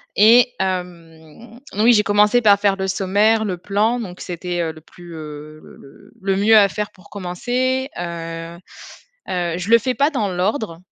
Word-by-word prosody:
Et, 240 Hz, +4 st, +5 dB
hem, 180 Hz, +3 st, -6 dB
oui, 225 Hz, +4 st, +4 dB
j'ai 210 Hz, -1 st, +3 dB
commencé 210 Hz, +4 st, +3 dB
par 205 Hz, -2 st, +5 dB
faire 200 Hz, -1 st, +2 dB
le 190 Hz, 0 st, -2 dB
sommaire, 205 Hz, +4 st, +1 dB
le 185 Hz, -3 st, -3 dB
plan, 210 Hz, +6 st, 0 dB
donc 185 Hz, -5 st, -8 dB
c'était, 175 Hz, 0 st, -4 dB
heu, 160 Hz, -1 st, -2 dB
le 155 Hz, 0 st, -15 dB
plus, 175 Hz, +1 st, -14 dB
heu, 155 Hz, 0 st, -9 dB
le -, -, -15 dB
le 135 Hz, -, -18 dB
le 195 Hz, 0 st, 0 dB
mieux 215 Hz, +3 st, +4 dB
à 200 Hz, -2 st, +5 dB
faire 210 Hz, +1 st, -4 dB
pour 185 Hz, -, -20 dB
commencer. 250 Hz, +8 st, -2 dB
Heu 165 Hz, -1 st, -6 dB, 0.7 s
heu, 175 Hz, -2 st, -2 dB
je 185 Hz, +4 st, -5 dB
le 230 Hz, -, +7 dB
fais 255 Hz, +3 st, -2 dB
pas 285 Hz, +2 st, +2 dB
dans 215 Hz, -9 st, -1 dB
l'ordre 185 Hz, 0 st, -2 dB
195 Hz, 180 wpm, -20 LUFS, 175-220 Hz, 0.7 s, le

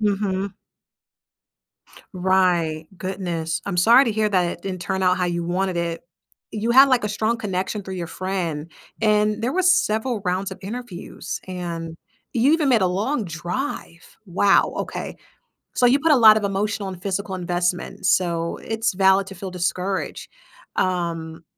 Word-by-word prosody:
Mhm. 200 Hz, -2 st, 0 dB, 1.6 s
Right, 180 Hz, -4 st, +1 dB
goodness, 170 Hz, -4 st, -3 dB
I'm 180 Hz, -3 st, -2 dB
sorry 235 Hz, +9 st, +7 dB
to 225 Hz, -, 0 dB
hear 215 Hz, 0 st, +1 dB
that 185 Hz, -3 st, +2 dB
it 175 Hz, -, -4 dB
didn't 185 Hz, -2 st, -5 dB
turn 190 Hz, 0 st, -2 dB
out 180 Hz, 0 st, +3 dB
how 180 Hz, -, 0 dB
you 170 Hz, -1 st, -2 dB
wanted 180 Hz, +1 st, -1 dB
it. 170 Hz, -1 st, -3 dB, 0.5 s
You 220 Hz, +2 st, -2 dB
had, 270 Hz, +3 st, +8 dB
like, 245 Hz, -4 st, +3 dB
a -, -, 0 dB
strong 220 Hz, +3 st, 0 dB
connection 195 Hz, 0 st, -3 dB
through 190 Hz, 0 st, -6 dB
your 175 Hz, -2 st, -4 dB
friend, 170 Hz, -4 st, -3 dB, 0.3 s
and 210 Hz, 0 st, +2 dB
there 250 Hz, -, 0 dB
were 370 Hz, +2 st, +1 dB
several 245 Hz, -, +2 dB
rounds 185 Hz, +1 st, -1 dB
of -, -, -8 dB
interviews, 210 Hz, -2 st, -6 dB
and 170 Hz, -3 st, -5 dB, 0.4 s
you 250 Hz, +5 st, +4 dB
even 315 Hz, -3 st, +2 dB
made 235 Hz, -6 st, +4 dB
a -, -, +4 dB
long 210 Hz, +8 st, -1 dB
drive! 175 Hz, -, -5 dB
Wow, 195 Hz, +3 st, +3 dB
okay. -, -, -5 dB, 0.6 s
So, 250 Hz, -, +2 dB
you 255 Hz, +4 st, +5 dB
put 320 Hz, +2 st, +3 dB
a 290 Hz, -, +6 dB
lot 220 Hz, -3 st, +8 dB
of 215 Hz, -, 0 dB
emotional 200 Hz, +1 st, -1 dB
and 180 Hz, -1 st, -9 dB
physical 195 Hz, 0 st, -3 dB
investments, 175 Hz, 0 st, -1 dB
so 170 Hz, -2 st, 0 dB
it's 225 Hz, -1 st, -1 dB
valid 190 Hz, +1 st, +4 dB
to 195 Hz, -, -9 dB
feel 190 Hz, 0 st, -7 dB
discouraged, 185 Hz, +2 st, -2 dB, 0.5 s
um, 170 Hz, -3 st, -2 dB
190 Hz, 160 wpm, -22 LUFS, 175-215 Hz, 1.6 s, had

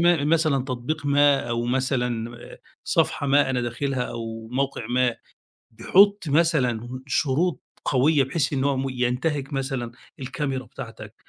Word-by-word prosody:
م 170 Hz, -4 st, +3 dB
مثلًا 155 Hz, -5 st, +2 dB
تطبيق 130 Hz, +3 st, -3 dB
ما 140 Hz, -2 st, +3 dB
أو 120 Hz, 0 st, -1 dB
مثلًا 125 Hz, -2 st, -1 dB, 0.2 s
آآ، -, -, -12 dB, 0.3 s
صفحة 140 Hz, -, +1 dB
ما 140 Hz, 0 st, +4 dB
أنا 125 Hz, -1 st, 0 dB
داخلها 125 Hz, +2 st, -2 dB
أو 115 Hz, -2 st, -6 dB
موقع 135 Hz, -2 st, -2 dB
ما 125 Hz, 0 st, +1 dB, 0.5 s
بيحط 200 Hz, -, +4 dB
مثلًا 130 Hz, -6 st, +1 dB
شروط 150 Hz, +5 st, +1 dB, 0.2 s
قويّة، 140 Hz, +2 st, +3 dB
بحيث 145 Hz, +2 st, -1 dB
إنّه 140 Hz, 0 st, +1 dB
هو 140 Hz, -, 0 dB
م 135 Hz, +1 st, -1 dB
ينتهِك 130 Hz, +3 st, -1 dB
مثلًا 135 Hz, -3 st, -3 dB, 0.3 s
الكاميرا 135 Hz, 0 st, -3 dB
بتاعتك -, -, -9 dB
135 Hz, 140 wpm, -24 LUFS, 125-145 Hz, 0.5 s, ما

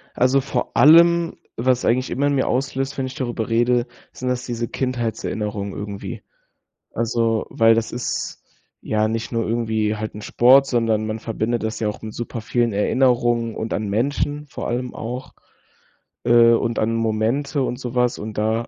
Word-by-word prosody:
Also 130 Hz, +2 st, +3 dB
vor 135 Hz, -, -3 dB
allem, 170 Hz, +2 st, +6 dB, 0.2 s
was 125 Hz, +1 st, +1 dB
eigentlich 125 Hz, +2 st, +1 dB
immer 140 Hz, +3 st, +1 dB
in 145 Hz, -, +1 dB
mir 130 Hz, -, +1 dB
auslöst, 135 Hz, +1 st, -1 dB
wenn 135 Hz, -, -1 dB
ich 130 Hz, -, -8 dB
darüber 120 Hz, -3 st, -3 dB
rede, 120 Hz, +2 st, +2 dB, 0.2 s
sind 125 Hz, -, -4 dB
das 125 Hz, +1 st, -2 dB
diese 120 Hz, -2 st, -3 dB
Kindheitserinnerungen 110 Hz, -5 st, -3 dB
irgendwie. 100 Hz, -1 st, -6 dB, 0.7 s
Also, 115 Hz, -1 st, 0 dB
weil 115 Hz, 0 st, +4 dB
das 115 Hz, -1 st, -1 dB
ist 120 Hz, -1 st, -4 dB, 0.4 s
ja 110 Hz, 0 st, 0 dB
nicht 115 Hz, +1 st, -3 dB
nur 115 Hz, -2 st, -1 dB
irgendwie 110 Hz, -2 st, 0 dB
halt 110 Hz, 0 st, -5 dB
'n 105 Hz, -, -7 dB
Sport, 130 Hz, +6 st, +5 dB
sondern 115 Hz, -4 st, +1 dB
man 110 Hz, +1 st, -4 dB
verbindet 115 Hz, +1 st, -2 dB
das 110 Hz, 0 st, -3 dB
ja 110 Hz, -, -1 dB
auch 105 Hz, -, -6 dB
mit 110 Hz, -1 st, -6 dB
supervielen 120 Hz, 0 st, -2 dB
Erinnerungen 120 Hz, +1 st, +2 dB
und 110 Hz, -, -4 dB
an 105 Hz, -1 st, -2 dB
Menschen 145 Hz, +7 st, -1 dB
vor -, -, -6 dB
allem 125 Hz, +1 st, -3 dB
auch. 125 Hz, +3 st, -6 dB, 0.9 s
Äh, 120 Hz, -1 st, +6 dB
und 115 Hz, 0 st, 0 dB
an 115 Hz, +1 st, 0 dB
Momente 115 Hz, +6 st, 0 dB
und 125 Hz, -1 st, -3 dB
so 125 Hz, -2 st, -6 dB
was 125 Hz, -1 st, +2 dB
und 105 Hz, 0 st, -7 dB
da 110 Hz, +2 st, 0 dB
120 Hz, 170 wpm, -21 LUFS, 110-130 Hz, 0.9 s, allem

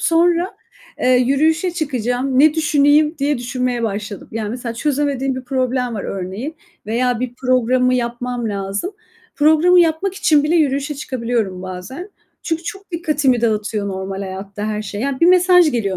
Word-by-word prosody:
sonra, 345 Hz, +3 st, +2 dB, 0.4 s
eee, -, -, +2 dB
yürüyüşe 280 Hz, +8 st, +3 dB
çıkacağım, 260 Hz, -5 st, -1 dB
ne 305 Hz, +1 st, +6 dB
düşüneyim, 300 Hz, 0 st, +3 dB
diye 285 Hz, -1 st, 0 dB
düşünmeye 245 Hz, 0 st, -2 dB
başladım. 205 Hz, -2 st, -4 dB
Yani, 215 Hz, -2 st, -3 dB
mesela 240 Hz, 0 st, -5 dB
çözemediğim 275 Hz, -1 st, -1 dB
bir 255 Hz, 0 st, -6 dB
problem 255 Hz, -2 st, -1 dB
var 200 Hz, -, -4 dB
örneğin 195 Hz, -, -5 dB, 0.3 s
veya 240 Hz, +2 st, 0 dB
bir 250 Hz, -1 st, -3 dB
programımı 255 Hz, 0 st, +2 dB
yapmam 240 Hz, 0 st, -2 dB
lazım. 200 Hz, -, -3 dB, 0.4 s
Programı 315 Hz, +4 st, +5 dB
yapmak 340 Hz, +3 st, +1 dB
için 305 Hz, -7 st, +3 dB
bile 330 Hz, +3 st, +2 dB
yürüyüşe 285 Hz, -1 st, +1 dB
çıkabiliyorum 235 Hz, -9 st, -3 dB
bazen. 190 Hz, -, -7 dB, 0.3 s
Çünkü 325 Hz, 0 st, -2 dB
çok 390 Hz, +2 st, -8 dB
dikkatimi 300 Hz, -7 st, +1 dB
dağıtıyor 210 Hz, -2 st, -1 dB
normal 190 Hz, 0 st, -4 dB
hayatta 195 Hz, +2 st, -6 dB
her 215 Hz, 0 st, -2 dB
şey. 205 Hz, 0 st, -6 dB
Yani, 265 Hz, +1 st, -2 dB
bir 335 Hz, -, +5 dB
mesaj 360 Hz, -2 st, +5 dB
geliyor 200 Hz, -6 st, -1 dB
255 Hz, 150 wpm, -19 LUFS, 225-310 Hz, 0.4 s, ne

